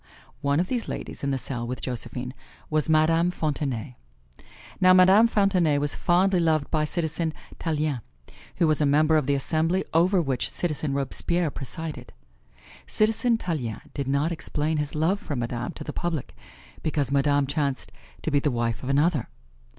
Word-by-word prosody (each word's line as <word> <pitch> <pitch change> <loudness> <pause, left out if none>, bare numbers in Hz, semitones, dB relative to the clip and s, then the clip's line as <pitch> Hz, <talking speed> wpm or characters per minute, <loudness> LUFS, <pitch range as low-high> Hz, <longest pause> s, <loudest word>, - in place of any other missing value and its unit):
One 140 +1 +1
of 175 - +2
these 240 0 -2
ladies - - -6
in 140 - 0
the 135 - 0
cell 120 -2 -3
with 125 +1 -4
Josephine 125 0 -4 0.4
was 155 0 +1
Madame 165 +2 +4
Fontenay. 140 -7 -3 0.8
Now 185 0 +6
Madame 190 +5 +7
Fontenay 190 -9 +2
was 145 0 +2
fondly 185 +2 +2
loved 155 -4 +1
by 155 -1 +2
Citizen 160 0 -1 0.2
Tallien, 155 -5 -1 0.5
who 170 - +2
was 155 0 +2
a - - +4
member 155 +2 +4
of 150 -3 +2
the 140 - +2
Assembly 160 +6 0
over 180 +4 +4
which 135 -6 -1
Citizen 155 -4 -2
Robespierre 160 +4 0
presided. 155 +4 -5 0.7
Citizen 225 +2 +2
Tallien 150 - -3
did 140 -2 -3
not 140 +4 +1
explain 155 -1 -1
his 150 0 -3
love 165 +6 +1
for 145 - -5
Madame 120 0 -3
to - - -8
the 150 - -6
public, 165 -6 -3 0.5
because 145 -4 -1
Madame 140 0 +3
chanced 140 -1 -2 0.3
to 160 - -1
be 145 - +3
the 145 - 0
wife 120 -2 -1
of 130 - -5
another. 145 -1 +2
155 Hz, 165 wpm, -25 LUFS, 140-170 Hz, 0.8 s, Madame